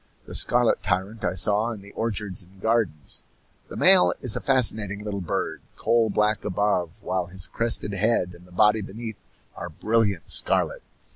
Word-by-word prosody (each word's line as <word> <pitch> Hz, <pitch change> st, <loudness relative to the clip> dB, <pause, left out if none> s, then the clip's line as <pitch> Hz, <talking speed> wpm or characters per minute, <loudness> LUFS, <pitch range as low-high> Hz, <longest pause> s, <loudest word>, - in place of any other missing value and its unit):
The -, -, -10 dB
scarlet 120 Hz, -1 st, +3 dB
tyrant 100 Hz, +4 st, -2 dB
I 90 Hz, -, -1 dB
saw 105 Hz, +5 st, +3 dB
in 110 Hz, -4 st, -7 dB
the 100 Hz, -, -13 dB
orchards 105 Hz, -4 st, -3 dB
and 95 Hz, +1 st, -16 dB
gardens. 100 Hz, -, -1 dB, 0.5 s
The -, -, -10 dB
male 90 Hz, 0 st, +6 dB
is 125 Hz, -4 st, +2 dB
a -, -, -3 dB
fascinating 110 Hz, -6 st, +1 dB
little 100 Hz, -2 st, -4 dB
bird, 85 Hz, -, -3 dB, 0.2 s
coal 115 Hz, -1 st, +2 dB
black 105 Hz, 0 st, 0 dB
above, 100 Hz, -1 st, -1 dB
while 90 Hz, -1 st, -2 dB
his 90 Hz, 0 st, -1 dB
crested 115 Hz, +2 st, 0 dB
head 100 Hz, -3 st, 0 dB
and 90 Hz, +1 st, -16 dB
the -, -, -20 dB
body 105 Hz, +4 st, +3 dB
beneath 110 Hz, +2 st, -7 dB, 0.4 s
are -, -, -7 dB
brilliant 100 Hz, -1 st, -1 dB
scarlet. -, -, 0 dB
105 Hz, 165 wpm, -24 LUFS, 90-110 Hz, 0.5 s, male